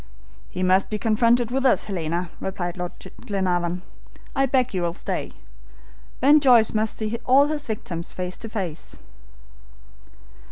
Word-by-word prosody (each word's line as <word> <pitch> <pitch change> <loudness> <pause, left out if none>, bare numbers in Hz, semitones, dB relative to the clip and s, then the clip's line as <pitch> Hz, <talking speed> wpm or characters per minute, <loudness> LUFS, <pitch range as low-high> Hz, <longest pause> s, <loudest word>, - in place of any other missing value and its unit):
"He 185 - -4
must 185 +1 +3
be 215 - -2
confronted 230 +2 +2
with 265 +1 0
us, 260 - +4
Helena," 175 -2 -3
replied 175 -2 -4
Lord 180 -1 -5 0.3
Glenarvan; 180 -3 -1 0.5
"I 270 0 +3
beg 255 -2 +1
you 185 - -1
will 170 0 -1
stay. - - -4 0.9
Ben 290 +4 +6
Joyce 245 -6 +5
must 215 0 0
see 220 +1 -2
all 270 +3 +5
his 295 0 -3
victims 175 -6 -4
face 180 0 -4
to 225 - -8
face." 185 -8 -5
210 Hz, 145 wpm, -23 LUFS, 180-245 Hz, 0.9 s, Ben